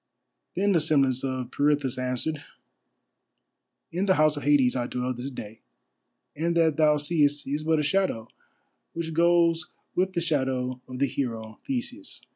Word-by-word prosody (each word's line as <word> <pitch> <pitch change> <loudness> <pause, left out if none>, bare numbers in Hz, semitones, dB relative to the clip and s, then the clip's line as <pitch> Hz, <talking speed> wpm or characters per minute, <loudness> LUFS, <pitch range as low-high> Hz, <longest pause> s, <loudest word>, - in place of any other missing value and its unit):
Then 200 +2 +2
the 175 - +4
semblance 140 -5 +2
of 130 -2 -3
Pirithous 145 -3 +1
answered: 130 +4 -2 1.5
"In 180 +4 -1
the 190 - +4
House 155 0 +4
of 145 - -5
Hades 140 -4 +3
I 120 -1 -1
dwell 125 0 -2
this 125 +3 -5
day, 110 -4 -9 0.8
and 170 +3 0
that 160 -3 +3
thou 150 -1 +4
seest 145 -1 +1
is 145 +3 -2
but 160 0 +2
a 150 - +1
shadow 150 - 0 0.7
which 165 -1 -4
goes 170 0 +3 0.3
with 185 +1 +1
the 170 - 0
shadow 130 -5 -1
of 130 - -7
the 140 - +2
hero 115 -5 -4
Theseus. 265 - -4
145 Hz, 155 wpm, -26 LUFS, 130-165 Hz, 1.5 s, the